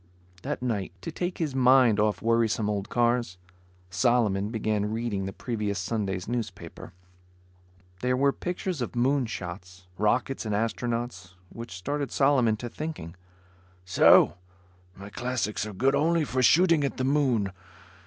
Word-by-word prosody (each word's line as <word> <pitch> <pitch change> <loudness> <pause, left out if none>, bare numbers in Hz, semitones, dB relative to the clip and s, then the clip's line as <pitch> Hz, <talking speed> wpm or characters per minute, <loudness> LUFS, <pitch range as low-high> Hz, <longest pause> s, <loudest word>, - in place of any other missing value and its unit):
That 125 - -4
night, 105 -8 -2
to - - -5
take 180 0 -3
his 155 -5 -2
mind 130 -4 +5
off 105 0 +1
worrisome 115 -2 +1
old 100 -1 -3
cars, 120 -5 +1 0.5
Solomon 105 -1 +1
began 110 -2 -1
reading 110 -4 -2
the 95 - -4
previous 105 -3 -3
Sunday's 95 -1 -3
newspaper. 110 -6 -6 1.1
There 125 0 0
were 140 +1 +3
pictures 180 -3 -4
of 120 - -4
moon 130 +1 +1
shots, 90 -3 -8
rockets 120 +6 0
and 105 -2 -2
astronauts, 115 -5 -3
which 115 -5 -8
started 140 +7 -3
Solomon 130 -6 +3
to 120 - -6
thinking; 135 - -6 0.7
"So, 90 - +5 0.6
my 100 +1 -10
classics 120 -4 -2
are - - -6
good 130 +8 +2
only 165 +3 +2
for 130 -1 -1
shooting 165 +3 +5
at 140 - -2
the 130 - -1
moon. 130 -8 +1
115 Hz, 140 wpm, -27 LUFS, 100-130 Hz, 1.1 s, mind